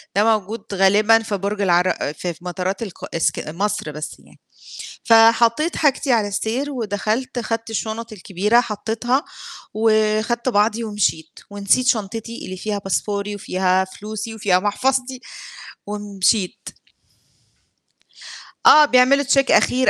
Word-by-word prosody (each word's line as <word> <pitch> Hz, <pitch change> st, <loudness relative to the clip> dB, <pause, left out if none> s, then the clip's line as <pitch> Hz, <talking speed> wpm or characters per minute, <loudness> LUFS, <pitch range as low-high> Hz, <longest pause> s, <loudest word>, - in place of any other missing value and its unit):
ده 205 Hz, -, +3 dB
موجود 210 Hz, +2 st, -8 dB
غالبًا 205 Hz, +4 st, +4 dB
في 205 Hz, -2 st, -3 dB
برج 200 Hz, +2 st, -3 dB
العر 180 Hz, -1 st, +3 dB
ف -, -, -5 dB, 0.2 s
في 170 Hz, -, -3 dB
مطارات 185 Hz, +3 st, -3 dB
الق 195 Hz, -5 st, -9 dB
إسك 165 Hz, -, -1 dB
مصر 170 Hz, -1 st, -3 dB
بس 150 Hz, +1 st, -7 dB
يعني. -, -, -21 dB, 0.6 s
فحطّيت 230 Hz, +7 st, +4 dB
حاجتي 285 Hz, -2 st, +1 dB
على 215 Hz, -3 st, +1 dB
السير 235 Hz, +8 st, -3 dB
ودخلت 230 Hz, +2 st, -3 dB
خدت 230 Hz, 0 st, -4 dB
الشنط 225 Hz, +1 st, -4 dB
الكبيرة 205 Hz, +4 st, +1 dB
حطّيتها، 230 Hz, +5 st, -2 dB, 0.5 s
وخدت 220 Hz, +2 st, +1 dB
بعضي 220 Hz, +1 st, +1 dB
ومشيت، 195 Hz, -7 st, -2 dB
ونسيت 205 Hz, +5 st, +1 dB
شنطتي 225 Hz, +1 st, -2 dB
اللي 185 Hz, 0 st, -7 dB
فيها 210 Hz, +2 st, -3 dB
باسبوري، 200 Hz, +1 st, -3 dB
وفيها 185 Hz, -1 st, 0 dB
فلوسي، 215 Hz, +3 st, -7 dB
وفيها 190 Hz, -4 st, +2 dB
محفظتي 255 Hz, +5 st, -1 dB, 0.7 s
ومشيت. 205 Hz, -1 st, -1 dB, 2.0 s
آه، 300 Hz, 0 st, +8 dB
بيعملوا 265 Hz, +2 st, +4 dB
check 275 Hz, 0 st, +2 dB
أخير 255 Hz, +1 st, +3 dB
215 Hz, 120 wpm, -20 LUFS, 200-235 Hz, 2.0 s, آه